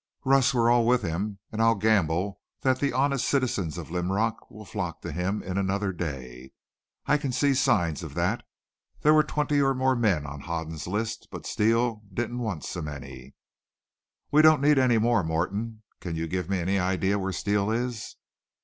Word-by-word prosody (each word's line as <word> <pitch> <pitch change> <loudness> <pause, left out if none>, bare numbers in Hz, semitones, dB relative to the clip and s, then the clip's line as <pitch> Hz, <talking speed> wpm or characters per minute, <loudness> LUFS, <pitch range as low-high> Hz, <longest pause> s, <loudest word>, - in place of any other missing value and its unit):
"Russ, 135 -1 +4
we're 120 -2 +2
all 120 -1 +4
with 125 -2 +3
him, 95 +4 -2
an' 110 0 -2
I'll 115 0 +5
gamble 100 -2 +1 0.2
that 130 -1 +2
the 140 - +1
honest 135 +1 +1
citizens 110 - 0
of 80 -2 -7
Linrock 95 +6 -1
will 110 +1 -11
flock 90 -6 -4
to - - -4
him 90 +6 -2
in 95 +1 -2
another 100 0 -1
day. 65 -6 -6 0.5
I 150 - +3
can 140 -3 -2
see 140 +2 +2
signs 115 - +2
of 80 -4 -8
that. 90 +7 0 0.6
There 150 - +5
were 155 - +6
twenty 150 -1 0
or 135 -1 +2
more 130 0 +2
men 100 - +1
on 70 0 -7
Hoden's 80 -1 -5
list, 105 +4 -3
but - - -8
Steele 115 +1 +1
didn't 120 +4 -3
want 105 - -3
so 85 - -4
many." 65 -3 -8 1.0
"We 150 - +6
don't 155 -1 +6
need 145 0 +4
any 125 -3 +4
more. 115 -2 +2
Morton, 100 +8 -2 0.2
can 85 -3 -5
you 80 0 -2
give 90 +1 -3
me 95 - +1
any 95 +3 0
idea 95 +2 +1
where 95 0 -2
Steele 100 +2 0
is?" 120 0 -3
100 Hz, 185 wpm, -27 LUFS, 85-120 Hz, 1.0 s, were